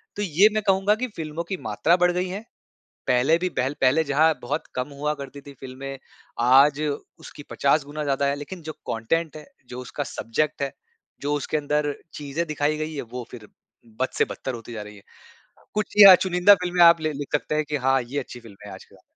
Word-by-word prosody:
तो 205 - -4
ये 195 +3 +4
मैं 215 -1 -1
कहूँगा 195 +2 +3
कि 255 +3 -3
फ़िल्मों 160 +1 -5
की 190 - -2
मात्रा 170 +3 +2
बढ़ 180 0 +3
गई 180 +1 -1
है, 195 +3 -5 0.7
पहले 130 +6 +3
भी 185 +1 -1
पहल 135 +3 -1
पहले 140 +5 +3
जहाँ 155 +3 +3
बहुत 145 +6 -3
कम 125 +2 -3
हुआ 150 +1 -1
करती 140 0 -9
थी 140 0 -12
फ़िल्में, 135 +1 -8 0.4
आज 135 +4 +5 0.4
उसकी 145 - -11
50 140 +1 +2
गुना 150 +1 -6
ज़्यादा 140 0 0
है, 140 - 0
लेकिन 165 +4 -8
जो 155 0 -6 0.2
कंटेंट 155 +8 -1
है, 150 -1 -11 0.2
जो 125 +1 -7
उसका 140 +3 -5
सब्जेक्ट 145 +6 -2
है, 140 - -2 0.5
जो 145 +1 0
उसके 145 +2 -2
अंदर 150 0 -1 0.2
चीजें 150 +3 -4
दिखाई 150 0 -1
गई 155 0 -4
हैं, 140 - -4
वो 120 +1 -7
फिर 110 -4 -11 0.5
बद 130 - +2
से - - +5
बदतर 130 - -6
होती 115 0 -9
जा 105 -2 -6
रही 105 0 -11
है। 100 - -16 0.7
कुछ 210 -1 0
चिया 200 -2 +10
चुनिंदा 185 +2 +5
फ़िल्में 180 -1 +2
आप 170 0 +7
लि 155 -1 -1
लिख 145 0 -6
सकते 150 +1 -1
हैं 155 - +1
कि 150 - -1
हाँ, 135 0 +2
ये 130 +4 -5
अच्छी 120 -1 -10
फ़िल्म 110 -4 -14
है - - -9
आज - - -12
के - - -23
जमाने - - -20
145 Hz, 220 wpm, -24 LUFS, 135-165 Hz, 0.7 s, चिया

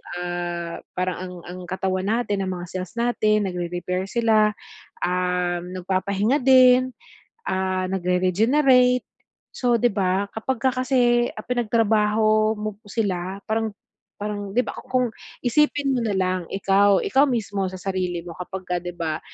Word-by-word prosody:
ah, 175 -1 -4 0.2
parang 185 0 -1
ang 185 0 -6
ang 180 +1 -8
katawan 185 +1 -2
natin, 205 -4 0
ang 185 - -2
mga 175 -1 -8
cells 185 +1 -6
natin 215 -4 +1
nagre-repair 180 +1 -3
sila, 215 -1 +2 0.5
um, 180 0 -1
nagpapahinga 195 +7 0
din, 255 -1 +5 0.5
ah, 185 0 -1
nagre-regenerate. 225 +9 +3 0.5
So, 240 -2 +2
di 245 - +4
ba 195 -1 0
kapagka 260 +2 0 0.2
kasi, 240 -2 +3
ah, - - -8
pinagtrabaho 215 -2 +2
mo 215 -1 -4
po 210 0 -29
sila 190 -3 -2
parang 220 -1 0 0.4
parang 205 -1 -4
di 250 - +4
ba, - - -5
ku - - -11
kung 255 -1 +2 0.4
isipin 285 +2 +2
mo 255 - 0
nalang 185 -5 -1
ikaw, 195 0 +3
ikaw 275 +2 +3
mismo 205 -6 -1
sa 185 - -7
sarili 180 -2 -3
mo 175 - -8
kapagka 180 -1 -4
di 175 - -7
ba 160 -1 -2
200 Hz, 140 wpm, -23 LUFS, 185-235 Hz, 0.5 s, din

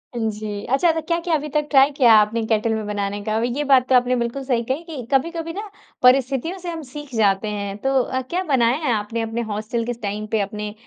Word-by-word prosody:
हाँ 225 -2 0
जी, 210 -1 -6
अच्छा 275 +7 +3
तो 320 0 -2
क्या-क्या 335 0 0
अभी 300 0 -3
तक 300 0 +1
ट्राई 275 +1 +6
किया 240 -5 +6
आपने 215 +2 +1
केटल 220 0 +1
में 220 -1 -3
बनाने 205 0 -3
का? 215 0 -2
अभी 240 +2 0
ये 295 - 0
बात 265 -3 +4
तो 260 - +5
आपने 250 0 +3
बिल्कुल 240 +3 -2
सही 245 -3 0
कही 280 +6 -1
कि 305 -8 -7
कभी-कभी 330 +4 0
ना, 415 +2 -6 0.3
परिस्थितियों 270 +7 +3
से 355 - -6
हम 330 -1 -5
सीख 290 +1 -10
जाते 205 -1 +2
हैं। 200 -1 -4
तो 270 - 0
अ, 260 0 -2
क्या 365 +2 -1
बनाया 255 -5 +2
है 255 - +2
आपने 220 +2 -2
अपने 225 +1 -3
हॉस्टल 215 +3 -2
स - - -11
के 245 - -1
टाइम 210 0 -4
पे 220 - +2
अपने 210 +1 -4
245 Hz, 245 wpm, -21 LUFS, 215-290 Hz, 0.3 s, ट्राई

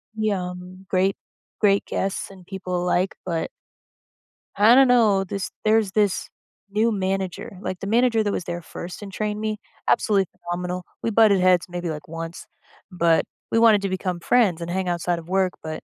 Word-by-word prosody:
yum, 185 -3 -3
great 190 +1 +2 0.4
great 200 -2 +3
guests 195 0 -2
and 190 -2 -14
people 180 -1 -3
alike, 180 +1 +1
but 170 -3 -2 1.1
I 220 +4 +7
don't 270 0 +7
know, 220 -6 +4
this 195 +1 -4
there's 215 -2 +3
this 205 -1 +1 0.4
new 220 +3 +2
manager. 190 -2 -3
Like, 185 -3 -4
the 195 - -5
manager 230 0 +3
that 205 - 0
was 185 - -2
there 175 0 -5
first 175 +3 -8
and 200 -1 -8
trained 210 +1 -2
me, 215 -1 -2 0.3
absolutely 200 -3 +3
phenomenal. 180 +1 -4 0.2
We - - -1
butted 210 -3 +5
heads 180 -1 +4
maybe, 175 -1 -4
like, 150 -1 -6
once, 165 +1 -7 0.5
but 170 -2 +2 0.3
we 225 - +3
wanted 220 -3 +6
to 195 - 0
become 185 -1 -2
friends 190 -3 +2
and 170 - -4
hang 185 +1 -1
outside 175 0 -1
of 165 - -12
work, 185 0 +1
but 155 0 -6
190 Hz, 175 wpm, -23 LUFS, 180-210 Hz, 1.1 s, I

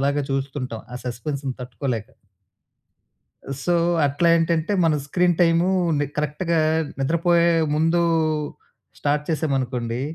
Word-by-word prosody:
అలాగే 140 +1 +1
చూస్తుంటాం. 135 -4 -3
ఆ - - -3
సపెన్స్‌ని 130 +3 -4
తట్టుకోలేక. 120 -2 -4 1.6
సో, 175 - +1 0.3
అట్లా 145 +5 0
ఏంటంటే 165 +1 +1
మన 160 -2 +3
స్క్రీన్ 180 +3 +2
టైమూని 170 -2 +2
కరెక్ట్‌గా 150 +3 -1 0.4
నిద్రపోయే 170 +4 +2 0.3
ముందూ 165 +2 +2 1.0
స్టార్ట్ 145 +1 0
చేశామనుకోండి. 130 -6 -1
150 Hz, 95 wpm, -23 LUFS, 135-170 Hz, 1.6 s, మన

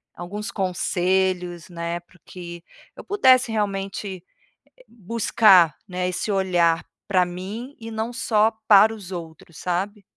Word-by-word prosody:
alguns 205 +5 -6
conselhos, 180 -2 -1
né, 170 0 -4
para 180 +1 -24
o - - -39
que 175 -2 -9 0.3
eu - - -10
pudesse, 260 - +4
realmente, 195 -3 -3 0.7
buscar, 205 -6 +4
né, 180 -1 -2
esse 180 - -3
olhar 175 -4 +2 0.2
para 185 -3 +3
mim 200 +10 -7
e 225 0 -8
não 220 +2 -3
só 225 -3 +2 0.2
para 215 +2 +7
os 195 -4 -11
outros, 170 0 -9
sabe? 195 +3 -3
190 Hz, 130 wpm, -23 LUFS, 175-215 Hz, 0.7 s, para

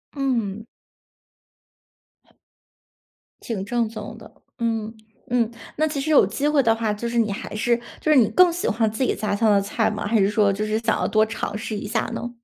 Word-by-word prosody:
嗯。 230 -7 -1 2.8
挺 215 -5 -4
正 235 +1 0
宗 215 0 -8
的， 220 - -13 0.3
嗯 225 -1 -2 0.4
嗯。 235 -2 +1 0.3
那 310 +1 +2
其 295 -2 -3
实 310 +3 -1
有 285 - +6
机 225 +9 -1
会 300 -2 +3
的 225 -2 +4
话， 225 -2 -1
就 220 +3 -4
是 240 - -2
你 220 -3 +2
还 200 - -6
是 235 +2 +1 0.2
就 310 - +1
是 300 - +6
你 235 -5 +6
更 355 - +5
喜 350 +1 -2
欢 220 0 +1
自 220 +5 -2
己 - - +1
家 205 -1 -1
乡 220 +1 +2
的 200 -1 +4
菜 215 +2 0
吗？ 210 -1 -4
还 225 0 +2
是 195 0 +3
说 210 -1 +3
就 205 +2 -2
是 215 0 0
想 225 -1 0
要 - - 0
多 215 -1 +3
尝 220 -1 -4
试 220 0 -5
一 205 - -5
下 220 +1 0
呢？ 240 - -4
225 Hz, 220 characters per minute, -23 LUFS, 210-240 Hz, 2.8 s, 有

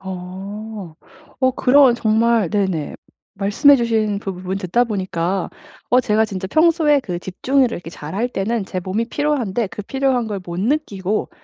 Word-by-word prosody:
어. 190 +1 -7 0.5
어 260 -1 +4
그런 265 0 +5
정말 225 -3 +2
네네. 190 -7 -1 0.4
말씀해 205 +9 +5
주신 220 -4 0
부 195 - -4
부분 185 +1 -4
듣다 195 +6 +1
보니까 190 -4 -2 0.4
어 250 - +5
제가 220 -2 +2
진짜 190 -3 -5
평소에 310 - +3
그 180 -9 -4
집중을 260 +10 +1
이렇게 170 -4 -6
잘할 190 +10 -4
때는 225 -1 -2
제 190 - -5
몸이 200 +6 -2
피로한데 250 -7 -1
그 210 - -7
피로한 265 +1 0
걸 205 -2 -4
못 175 0 -6
느끼고 215 -5 -1
210 Hz, 295 characters per minute, -20 LUFS, 190-245 Hz, 0.5 s, 그런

